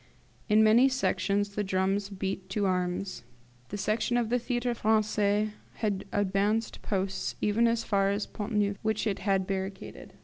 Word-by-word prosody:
In 215 +1 +6
many 235 +5 +6
Sections 205 -6 0
the 205 +1 -2
drums 195 +1 0
beat 190 -1 -4
to 200 +1 0
arms; 185 +1 -1 0.5
the 205 - -4
Section 215 +4 0
of 235 -2 0
the 245 +1 +2
Theatre 240 0 -1
Francais 215 -1 +1 0.2
had 205 -4 -2
advanced 205 +3 0
posts 195 -1 -2
even 220 +3 +2
as 230 0 +1
far 195 -2 +2
as 200 +1 -1
the - - -23
Pont 210 +2 -5
Neuf, 205 -1 +1
which 220 0 0
it 200 -3 -1
had 195 -2 +1
barricaded. 190 0 -5
205 Hz, 165 wpm, -29 LUFS, 195-220 Hz, 0.5 s, In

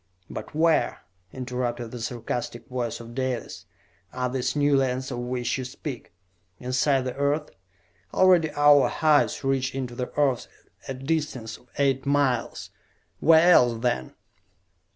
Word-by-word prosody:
"But - - -7
where," 160 0 +2 0.3
interrupted 125 -2 -4
the 120 - -7
sarcastic 120 +1 -4
voice 125 -3 -3
of 115 0 -10
Dalis, 130 -2 -4 0.4
"are 125 0 -2
these 130 +1 -1
new 145 -1 +3
lands 130 -1 0
of - - -4
which 125 +1 -2
you - - -3
speak? 130 +1 -7 0.5
Inside 130 +2 +1
the 125 -1 -4
Earth? 145 +2 0 0.6
Already 180 -4 +4
our 145 -1 +6
hives 155 -2 +2
reach 135 -1 0
into 130 -2 -4
the 125 +1 -4
Earth 140 -4 +1 0.4
a 135 - -4
distance 135 -5 -3
of 125 - -25
eight 135 -1 +1
miles. 140 -4 0 0.5
Where 165 +2 +6
else, 120 -6 +4
then?" 120 - -1
130 Hz, 135 wpm, -25 LUFS, 125-145 Hz, 0.6 s, our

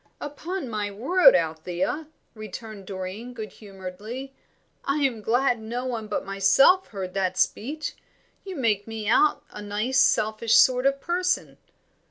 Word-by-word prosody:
"Upon 315 +3 -5
my 210 -3 -2
word, 265 - +5
Althea," 175 - -1 0.3
returned 215 -2 -9
Doreen, 195 +6 -6
good 215 -2 -6
humouredly, 210 +6 -8 0.5
"I 285 +1 0
am 240 -5 0
glad 245 +2 +2
no 240 +3 -4
one 230 -4 -3
but 210 - -3
myself 200 - +4
heard 190 -3 -6
that 185 -2 -1
speech. 290 +11 -1 0.5
You 385 -2 -7
make 215 - 0
me 220 -2 -5
out 300 +7 +3
a 210 - -8
nice 210 +6 0
selfish 220 -3 +3
sort 255 +1 +5
of 275 0 +1
person." 360 +1 -1
225 Hz, 140 wpm, -25 LUFS, 200-270 Hz, 0.5 s, word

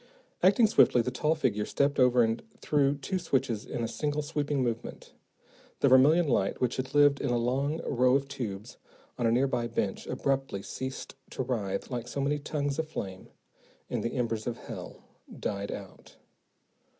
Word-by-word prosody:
Acting 200 +5 +5
swiftly, 125 - +5
the 125 - -2
tall 150 +5 +1
figure 115 -9 0
stepped 140 +6 0
over 125 -1 +5
and 115 +1 0 0.2
threw 145 -1 +2
two 185 +7 -3
switches 130 -9 -1
in 115 - -3
a - - 0
single, 145 +6 -2
sweeping 145 -2 -1
movement. 115 -2 -4 0.7
The 140 - +5
vermillion 150 +6 +6
light 100 -7 +1
which 125 -1 0
had 130 +2 -4
lived 145 -1 +5
in - - -1
a 120 - +2
long 135 +6 0
row 125 -1 +3
of 140 0 0
tubes 110 -5 -6 0.4
on 120 - +2
a - - +3
nearby 120 -1 +1
bench 105 -4 -2
abruptly 135 -8 -1
ceased 130 0 -6 0.2
to - - -3
writhe 115 -3 -3
like 120 -1 -3
so - - -5
many 145 +2 0
tongues 145 0 -2
of 160 -1 -2
flame, 95 -10 -6 0.6
and - - -1
the 115 - -2
embers 115 -3 -1
of 120 - -2
hell - - -9 0.4
died 100 -1 -3
out. 95 -2 -10
130 Hz, 175 wpm, -29 LUFS, 115-145 Hz, 0.7 s, vermillion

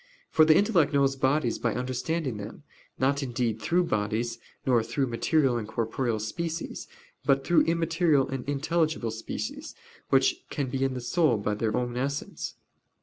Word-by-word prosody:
For 155 - +6
the 155 0 +6
intellect 195 -9 +3
knows 135 -1 +3
bodies 135 -2 +1
by 115 -1 0
understanding 130 +1 -2
them, 105 +6 -8 0.3
not 140 +2 +1
indeed 120 -4 -1
through 180 +1 +2
bodies, 110 -3 -1 0.3
nor 125 -3 +4
through 135 +5 -1
material 130 +2 +1
and 110 -3 -4
corporeal 115 +1 -1
species; 165 +10 -4 0.4
but 135 -1 +2
through 175 - +4
immaterial 165 -3 +2
and 135 -2 -4
intelligible 155 -3 0
species, 265 - -5 0.3
which - - +4
can 140 -4 -3
be 135 -1 -1
in 135 -1 0
the 125 - -4
soul 145 -1 +2
by 105 +1 -1
their 110 +1 -1
own 120 -1 -2
essence. 140 +3 -3
135 Hz, 155 wpm, -27 LUFS, 115-160 Hz, 0.4 s, For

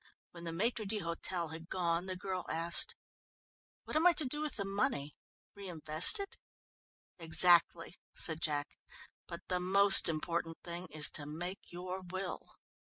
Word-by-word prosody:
When 170 -1 -11
the - - -4
maître 220 +6 -1
d'hôtel 175 -4 -4
had 165 +1 -10
gone 175 -1 -1
the 185 - -4
girl 185 -1 -5
asked: 170 - +1 0.9
"What - - -8
am 320 +3 +4
I 355 - +5
to 320 -3 0
do 295 +4 -3
with 305 -1 -4
the 200 - -4
money? 195 - -2 0.4
Reinvest 175 - +3
it?" 400 0 -7 0.8
"Exactly," 170 +1 +3 0.2
said 160 -1 +1
Jack, 145 -2 -3 0.5
"but - - -8
the 180 - -1
most 195 +2 +5
important 165 +1 -3
thing 175 +1 -6
is 150 0 +3
to 145 -2 -3
make 175 +5 -7
your 180 +2 -6
will." 185 +1 -7
180 Hz, 150 wpm, -33 LUFS, 165-195 Hz, 0.9 s, I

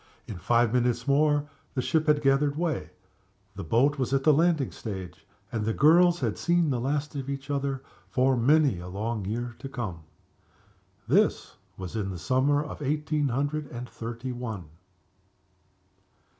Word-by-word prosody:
In 100 -5 -7
five 120 +3 +2
minutes 120 0 +1
more 145 +1 +3 0.3
the 130 - +1
ship 160 +2 +1
had 150 -1 +3
gathered 140 +1 +2
way; 155 - -1 0.7
the 100 - -5
boat 135 - +2
was 130 -1 -1
at 135 - 0
the 155 - +6
landing 160 -3 +2
stage 95 -5 -7 0.2
and 110 -2 -2
the 110 +1 -1
girls 175 +4 +5
had - - -1
seen 170 -3 +2
the 125 - 0
last 145 +4 -2
of 135 -1 -4
each 140 +1 -5
other 140 -1 -2 0.3
for 130 +4 +2
many 135 - +3
a 90 - -8
long 105 +3 -3
year 120 +4 -3
to 135 - -7
come. 110 -11 -5 1.1
This - - +2 0.2
was 95 +2 -7
in 105 -3 -2
the 95 - -5
summer 135 - +2
of 150 - -8
eighteen 150 +1 0
hundred 145 +4 -1
and 125 -1 -7
thirty 115 +3 -6
one. 110 -9 -6
135 Hz, 160 wpm, -27 LUFS, 115-145 Hz, 1.1 s, the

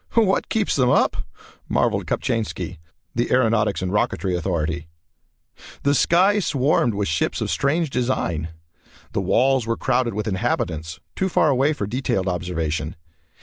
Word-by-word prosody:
"What 215 -4 +2
keeps 220 -2 +1
them 125 -3 +3
up!" - - +3 0.5
marvelled - - +1
Kopchainski, 115 -8 -2 0.3
the 120 +1 -1
aeronautics 110 -6 +2
and 90 - -2
rocketry 95 -2 0
authority. 85 -2 -2 1.0
The 140 - +3
sky 185 +9 +4
swarmed 135 - +1
with 100 0 -1
ships 80 0 0
of - - -2
strange 155 +2 0
design. 120 - -1 0.6
The - - -1
walls 130 -1 +2
were 115 - 0
crowded 125 -4 0
with 105 +1 -2
inhabitants, 80 -4 -2 0.2
too 190 - 0
far 160 - +3
away 140 +3 +3
for 135 -8 -3
detailed 105 -4 -1
observation. 85 -3 -2
115 Hz, 140 wpm, -22 LUFS, 90-135 Hz, 1.0 s, sky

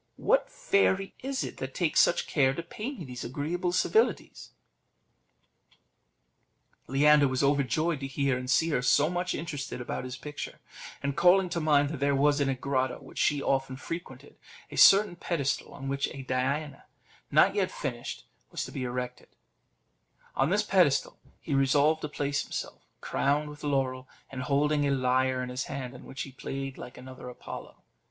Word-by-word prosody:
What - - +2
fairy 400 - +1
is 270 0 -2
it - - -6
that - - -6
takes - - +2
such - - +4
care 135 -3 +2
to 170 - -4
pay 215 +9 -5
me 195 - -8
these 125 -2 -7
agreeable 160 +8 -2
civilities?" 220 +5 +1 2.4
Leander 145 +2 +5
was 130 +1 0
overjoyed 145 +3 +1
to 135 - -4
hear 135 -1 0
and 125 0 -5
see 160 +5 +3
her 140 - +1
so 145 +5 +3
much 180 0 -1
interested 145 -5 -5
about 120 - -4
his 130 0 -6
picture, 145 +2 -7 0.4
and 140 -1 -1
calling 180 +2 +5
to 170 - -2
mind 145 -2 +3
that 155 -3 -5
there 140 0 +2
was 145 +1 +3
in 140 - +2
a 135 - 0
grotto 130 -1 -1
which - - -10
she 145 -2 +2
often 135 -1 0
frequented 165 +5 -8 0.3
a - - -7
certain 195 -2 +7
pedestal, 155 -6 -2
on 135 -1 -8
which 140 0 0
a 135 - -7
Diana, 135 +4 -2 0.4
not - - +5
yet - - +1
finished, - - -5 0.2
was - - -4
to - - -9
be - - -5
erected, 125 0 -4 1.1
on 135 +3 +2
this 210 +3 +2
pedestal 180 -9 +2 0.2
he 150 - -4
resolved 145 +3 +3
to 150 - -4
place 145 -1 -1
himself, - - -6 0.2
crowned 145 +2 0
with 150 - -13
laurel, 130 -3 -1 0.2
and 130 -1 -5
holding 145 +2 +2
a - - +1
lyre 130 -1 +1
in 125 - -5
his 125 +1 -3
hand, 130 -2 -5
on 125 - -12
which 135 - -5
he 135 - -9
played 135 +1 -5
like 125 - -9
another 130 0 -9
Apollo. 125 - -9
140 Hz, 175 wpm, -29 LUFS, 130-165 Hz, 2.4 s, certain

